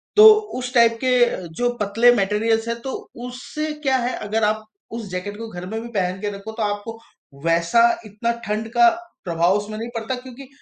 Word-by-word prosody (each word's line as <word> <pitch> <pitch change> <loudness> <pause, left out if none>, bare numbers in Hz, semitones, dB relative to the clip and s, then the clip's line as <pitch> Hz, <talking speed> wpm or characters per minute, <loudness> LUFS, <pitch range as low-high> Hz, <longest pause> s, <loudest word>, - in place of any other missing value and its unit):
तो 425 - +9 0.3
उस 250 0 -5
टाइप 230 -1 +5
के 240 -8 +2
जो 245 0 +1
पतले 230 +4 +4
मटेरियल्स 225 +3 +1
हैं, 230 0 -2
तो 265 - -4 0.4
उससे 305 +5 -5
क्या 265 -1 +3
है? 245 0 -1
अगर 215 +1 -2
आप 215 +1 +1 0.3
उस 225 -2 -5
जैकेट 205 +3 -4
को 225 0 -6
घर 180 -2 -7
में 220 - -3
भी 235 - -7
पहन 185 -2 -1
के 210 - -1
रखो 205 +3 -8
तो 220 0 -3
आपको 210 +2 -3 0.5
वैसा 170 +7 +3 0.2
इतना 215 +3 -2
ठंड 215 +2 -2
का 355 -1 +7 0.4
प्रभाव 170 +2 +2
उसमें 210 +1 -5
नहीं 230 +2 -5
पड़ता, 230 +3 -2
क्योंकि 255 +1 -11
225 Hz, 190 wpm, -22 LUFS, 205-245 Hz, 0.5 s, तो